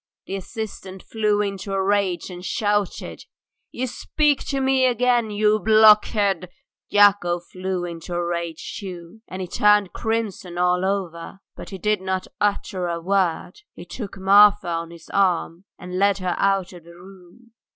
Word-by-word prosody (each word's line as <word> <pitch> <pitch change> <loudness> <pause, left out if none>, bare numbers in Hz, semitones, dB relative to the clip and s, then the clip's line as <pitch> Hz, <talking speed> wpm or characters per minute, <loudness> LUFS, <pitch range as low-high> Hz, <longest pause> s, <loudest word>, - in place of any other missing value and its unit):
The 195 - -5
assistant 195 -1 -7
flew 210 -2 0
into 195 -1 -4
a 195 0 0
rage 195 -2 0
and 180 0 -9
shouted: 205 -1 -2 0.5
"You 255 - -3
speak 295 +3 0
to 275 - -2
me 265 -1 +3
again! 245 -2 +1
You 210 +1 +2
blockhead... 210 -4 +4 0.2
." - - -72
Yakov 195 -4 +4
flew 185 -1 -3
into 170 0 -7
a 175 0 -1
rage 170 -2 -4
too, 185 +1 -9
and 185 0 -6
he - - -6
turned 210 +1 +3
crimson 215 -6 -3
all 180 +1 +2
over, 190 -1 -4
but - - -10
he 195 - -7
did 210 +1 0
not 190 0 -2
utter 200 -3 -1
a 170 -1 -3
word. 190 - -1
He - - -10
took 200 -5 -8
Marfa 200 0 +5
on 165 0 -3
his 170 -1 -14
arm 180 -2 0
and 180 +1 -6
led 200 0 +3
her 185 -2 -2
out 195 -2 +1
of 175 -2 -13
the 170 +1 -15
room. 190 +5 -17
195 Hz, 160 wpm, -22 LUFS, 180-210 Hz, 0.5 s, Marfa